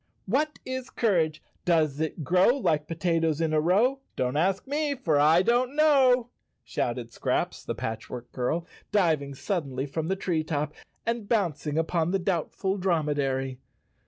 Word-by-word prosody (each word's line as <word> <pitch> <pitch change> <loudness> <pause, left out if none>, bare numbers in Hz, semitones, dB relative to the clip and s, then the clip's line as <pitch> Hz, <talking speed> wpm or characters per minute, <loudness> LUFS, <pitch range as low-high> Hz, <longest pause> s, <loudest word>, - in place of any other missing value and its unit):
" - - -43
What 305 +2 +1
is 260 0 -4
courage? 165 -9 +1 0.2
Does 155 -5 +2
it 160 0 -2
grow 185 - +4
Like 155 - 0
potatoes 165 -2 0
in 160 -1 0
a 155 - +3
row? 215 - +3 0.2
Don't 125 +1 -1
ask 185 +5 +1
me 290 +1 -1
for 160 - +1
I 160 +5 +5
don't 245 +5 +2
know! 260 -6 +4 0.2
" - - -50
shouted 120 -1 -3
Scraps, - - -1
the - - -4
Patchwork 115 +2 -6
Girl, 155 +7 -1 0.3
diving 160 -9 +1
suddenly 140 -6 -2
from 155 +3 -3
the 190 - +1
tree 175 -4 -1
top 150 -1 -2 0.3
and 230 -2 -2
bouncing 160 - 0
upon 165 0 +1
the 195 - +2
Doubtful 190 +1 -1
Dromedary. 145 -7 0
165 Hz, 160 wpm, -27 LUFS, 150-210 Hz, 0.3 s, I